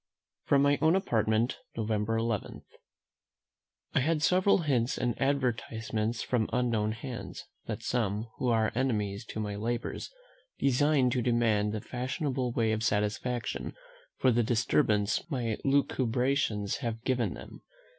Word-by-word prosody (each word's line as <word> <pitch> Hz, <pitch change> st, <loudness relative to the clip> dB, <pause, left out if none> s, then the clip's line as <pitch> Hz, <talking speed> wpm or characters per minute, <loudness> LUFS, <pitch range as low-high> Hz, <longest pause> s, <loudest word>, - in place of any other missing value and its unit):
From 140 Hz, -1 st, +4 dB
my 145 Hz, 0 st, +3 dB
own 160 Hz, +2 st, +5 dB
Apartment, 115 Hz, -, +1 dB, 0.2 s
November 110 Hz, 0 st, 0 dB
11. 115 Hz, -2 st, -2 dB, 1.3 s
I -, -, +3 dB
had 155 Hz, +3 st, +1 dB
several 185 Hz, +1 st, +4 dB
hints 130 Hz, -5 st, +1 dB
and 120 Hz, -, 0 dB
advertisements 115 Hz, -4 st, -1 dB
from 120 Hz, -4 st, 0 dB
unknown 115 Hz, -4 st, +1 dB
hands, 120 Hz, +2 st, -7 dB, 0.2 s
that -, -, -4 dB
some, 110 Hz, -3 st, -1 dB
who 130 Hz, -, 0 dB
are 110 Hz, -2 st, +2 dB
enemies 110 Hz, -5 st, -1 dB
to 110 Hz, -, -6 dB
my 105 Hz, -1 st, -3 dB
labours, 115 Hz, +3 st, -3 dB, 0.5 s
design 140 Hz, -1 st, +3 dB
to 125 Hz, -1 st, +1 dB
demand 115 Hz, -3 st, +2 dB
the 110 Hz, -1 st, -3 dB
fashionable 130 Hz, +1 st, -2 dB
way 115 Hz, -2 st, +1 dB
of 110 Hz, 0 st, -1 dB
satisfaction 110 Hz, +3 st, -1 dB, 0.4 s
for 130 Hz, -, +3 dB
the 120 Hz, 0 st, +3 dB
disturbance 110 Hz, -, +1 dB
my 120 Hz, -7 st, -1 dB
Lucubrations 130 Hz, -5 st, +1 dB
have 115 Hz, -3 st, -4 dB
given 125 Hz, -2 st, 0 dB
them. -, -, -11 dB
120 Hz, 130 wpm, -30 LUFS, 110-130 Hz, 1.3 s, own